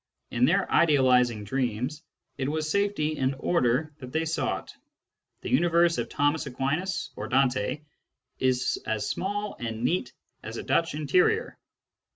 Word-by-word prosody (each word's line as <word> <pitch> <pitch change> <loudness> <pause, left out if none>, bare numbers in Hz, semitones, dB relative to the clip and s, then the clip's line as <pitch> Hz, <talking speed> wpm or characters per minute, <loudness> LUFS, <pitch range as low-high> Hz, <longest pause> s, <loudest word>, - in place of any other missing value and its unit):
In 120 +1 +3
their 190 +7 +2
idealising 125 -8 +4
dreams, 125 +5 -2 0.3
it 135 0 -2
was 155 0 -1
safety 200 -7 0
and 130 +1 +1
order 150 -1 +1
that 125 -2 -9
they 160 +2 0
sought: 160 0 -2 0.7
the - - -5
universe 170 0 +3
of - - -3
Thomas 145 +1 0
Aquinas 140 +5 -2
or - - -5
Dante 130 +1 +1 0.6
is 130 -1 +1
as 110 -1 -1
small 205 +2 -3
and 115 -1 -4
neat 125 -2 0 0.3
as - - -7
a - - -5
Dutch 165 -2 +1
interior. 155 +4 +1
145 Hz, 140 wpm, -27 LUFS, 125-165 Hz, 0.7 s, idealising